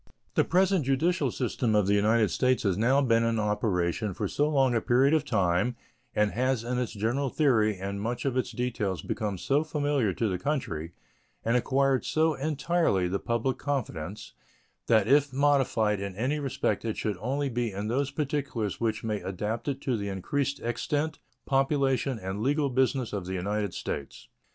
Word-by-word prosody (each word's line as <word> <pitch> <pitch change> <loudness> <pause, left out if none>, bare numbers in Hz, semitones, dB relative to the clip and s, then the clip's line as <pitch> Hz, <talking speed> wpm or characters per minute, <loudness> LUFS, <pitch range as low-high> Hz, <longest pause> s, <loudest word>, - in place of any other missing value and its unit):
The - - +3
present 185 -1 +2
judicial 140 +3 +1
system 120 -2 -1
of 105 -2 +3
the 100 - +2
United 105 0 +3
States 130 -1 +1
has 100 -4 +2
now 125 +7 +3
been 115 -4 +3
in 115 0 +1
operation 105 -2 0
for - - -2
so 145 +1 +1
long 135 -4 +3
a 115 - +1
period 130 +6 +3
of 155 -2 +3
time 100 - +1 0.4
and 105 -1 +2
has 130 -1 0
in 125 +1 -1
its 125 - -2
general 120 +7 -1
theory 110 -8 +2
and 100 +2 -4
much 120 +5 -3
of 135 -2 0
its 130 - -1
details 110 - -2
become 105 -3 -2
so 140 - +1
familiar 145 -7 0
to 110 +5 -1
the 90 -3 -2
country 85 - -3 0.5
and 115 +2 +2
acquired 135 +1 +2
so 160 0 +2
entirely 150 - +1
the 95 +2 -1
public 120 +2 -1
confidence 105 - -4 0.5
that 110 -3 +4
if 145 +2 +4
modified 130 -7 +2
in 100 -1 -5
any 130 +8 -1
respect 140 -3 -1
it 110 -2 -3
should 105 -4 -2
only 135 +7 -1
be 120 -3 -1
in 100 +2 -4
those 135 +4 0
particulars 140 - -2
which 110 -1 -1
may 110 -2 -2
adapt 105 +6 -4
it 140 -1 -2
to 130 - 0
the 100 -2 -3
increased 140 +9 -2
extent, 145 +6 -2 0.3
population, 135 -1 +1
and 95 0 -5
legal 140 +2 +1
business 130 -2 +1
of 95 -3 -3
the 95 - -3
United 100 +2 -1
States. 70 -4 -6
120 Hz, 180 wpm, -28 LUFS, 105-140 Hz, 0.5 s, that